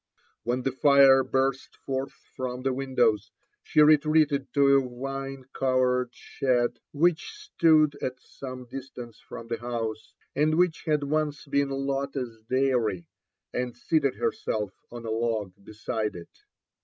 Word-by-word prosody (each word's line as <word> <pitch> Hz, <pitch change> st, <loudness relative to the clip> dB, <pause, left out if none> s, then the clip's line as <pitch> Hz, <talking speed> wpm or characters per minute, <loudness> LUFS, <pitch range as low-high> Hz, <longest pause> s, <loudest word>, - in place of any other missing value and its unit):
When 125 Hz, +2 st, -1 dB
the 135 Hz, -, 0 dB
fire 135 Hz, 0 st, +6 dB
burst 130 Hz, 0 st, -1 dB
forth 135 Hz, 0 st, -3 dB, 0.2 s
from 125 Hz, -1 st, -4 dB
the 135 Hz, -1 st, +1 dB
windows, 125 Hz, -5 st, +1 dB, 0.3 s
she 150 Hz, -, +2 dB
retreated 150 Hz, -2 st, +3 dB
to 140 Hz, -1 st, +6 dB
a 130 Hz, -2 st, 0 dB
vine 135 Hz, 0 st, -5 dB
covered 125 Hz, -1 st, +1 dB
shed 125 Hz, -1 st, -1 dB
which 170 Hz, -, +1 dB
stood 165 Hz, -, +3 dB
at 130 Hz, 0 st, -3 dB
some 130 Hz, -2 st, -9 dB
distance 125 Hz, -3 st, -9 dB
from 115 Hz, -, -10 dB
the 115 Hz, 0 st, -3 dB
house, 115 Hz, -2 st, -4 dB, 0.2 s
and 155 Hz, +2 st, +2 dB
wbich 175 Hz, -1 st, +1 dB
had 150 Hz, -2 st, +2 dB
once 150 Hz, 0 st, -1 dB
been 140 Hz, -1 st, +1 dB
Lotte's 135 Hz, -3 st, -3 dB
dairy, 125 Hz, -9 st, +1 dB, 0.5 s
and 125 Hz, -1 st, -3 dB
seated 140 Hz, 0 st, +1 dB
herself 105 Hz, -3 st, -2 dB, 0.2 s
on 120 Hz, -1 st, -8 dB
a 110 Hz, -, -3 dB
log 110 Hz, -4 st, -1 dB
beside 110 Hz, +1 st, -3 dB
it. 85 Hz, -1 st, -11 dB
130 Hz, 135 wpm, -27 LUFS, 120-140 Hz, 0.5 s, fire